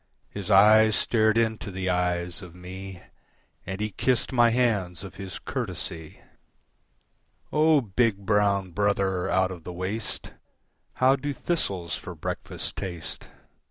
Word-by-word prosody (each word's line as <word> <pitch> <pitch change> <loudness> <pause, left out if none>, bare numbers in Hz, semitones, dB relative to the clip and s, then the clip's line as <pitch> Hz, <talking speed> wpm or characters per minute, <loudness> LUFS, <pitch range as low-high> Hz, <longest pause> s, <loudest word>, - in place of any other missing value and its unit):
His 100 -1 -5
eyes 110 +2 +7
stared 110 0 +3
into 110 -2 0
the 95 0 -4
eyes 90 0 0
of 90 -2 -11
me 95 +1 -9 0.6
And 95 +1 -4
he 105 0 -2
kissed 130 +6 0
my 120 -2 +5
hands 105 -8 0
of 95 - -9
his 95 -2 -6
courtesy. 80 -2 -5 1.3
"O 155 -1 +5
big, 115 -1 +1
brown 100 -2 +2
brother 95 -1 0
out 95 0 +2
of 90 -3 -8
the 90 - -6
waste, 95 +5 -4 0.6
How 130 +1 +4
do 145 +2 -3
thistles 95 - -2
for - - -8
breakfast - - -4
taste? 85 -4 -6
100 Hz, 130 wpm, -26 LUFS, 90-110 Hz, 1.3 s, eyes